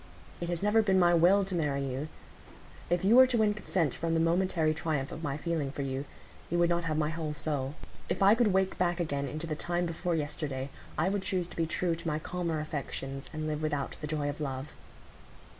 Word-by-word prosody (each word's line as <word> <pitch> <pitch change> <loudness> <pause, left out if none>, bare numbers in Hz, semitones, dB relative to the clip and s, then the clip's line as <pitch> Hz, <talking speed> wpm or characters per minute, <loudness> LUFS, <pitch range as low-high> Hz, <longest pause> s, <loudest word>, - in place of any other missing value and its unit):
It 170 - -3
has 175 +1 -2
never 210 +2 +5
been 195 -3 +3
my 175 -1 +5
will 185 +4 +5
to 190 - -4
marry 145 -5 0
you; 135 +3 -3 0.8
if 175 +1 +1
you 215 +4 +6
were 260 +1 +9
to 250 -2 +1
win 215 -2 +3
consent 180 -8 0
from 165 0 -1
the - - +3
momentary 165 -1 +2
triumph 150 -3 -2
of 160 - -6
my 145 -3 -2
feeling 155 -3 -2
for 140 - -4
you, 135 +1 -3 0.4
you 175 - 0
would 175 0 +3
not 170 0 +1
have 155 -2 0
my 155 0 +1
whole 160 -2 -3
soul. 145 -2 -2 0.3
If - - +1
I 200 +2 +8
could 230 0 +3
wake 190 -1 +1
back 175 0 +1
again 140 -4 -1
into 155 +5 -4
the 160 - -2
time 175 +3 -1
before 170 +1 -1
yesterday, 145 -3 -3 0.3
I 160 - +2
would 200 0 0
choose 185 -2 -1
to - - -11
be 165 -1 0
true 170 +1 0
to 170 +1 -5
my 150 -1 0
calmer 170 0 -2
affections, 135 -3 -4
and 155 -1 -4
live 155 0 -2
without 150 -3 -2
the 150 - -3
joy 150 -1 -1
of 145 +1 -4
love." 135 0 -4
165 Hz, 225 wpm, -30 LUFS, 150-175 Hz, 0.8 s, were